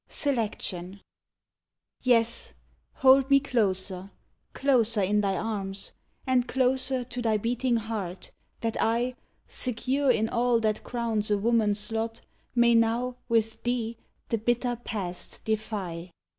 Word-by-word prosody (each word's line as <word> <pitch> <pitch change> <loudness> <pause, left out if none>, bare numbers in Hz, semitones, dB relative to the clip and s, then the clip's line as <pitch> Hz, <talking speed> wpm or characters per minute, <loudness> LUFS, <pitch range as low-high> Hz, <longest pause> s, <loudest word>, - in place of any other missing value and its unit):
SELECTION 205 - -1 1.0
Yes, 235 -2 +2 0.4
hold 270 0 +5
me 275 0 +7
closer, 195 -7 -1 0.4
closer 235 -6 +2
in 210 +2 +2
thy 195 -2 0
arms, 200 -3 -3 0.3
And 255 -2 +2
closer 260 0 +1
to 245 0 -6
thy 220 -2 +2
beating 240 +3 0
heart, 210 -5 -5 0.3
that 225 -1 -1
I, 235 +3 +1 0.3
Secure 260 +3 0
in 225 -3 +3
all 235 0 +2
that 215 -1 0
crowns 230 -3 -1
a 205 - +3
woman's 210 -1 +1
lot, 225 +1 -2 0.3
May 235 -1 +5
now, 235 +2 +2
with 225 -1 +1
thee, 240 -2 -1 0.3
the 230 - 0
bitter 240 +2 0
past 180 -5 -4
defy! 200 -6 -3
230 Hz, 120 wpm, -27 LUFS, 210-245 Hz, 1.0 s, me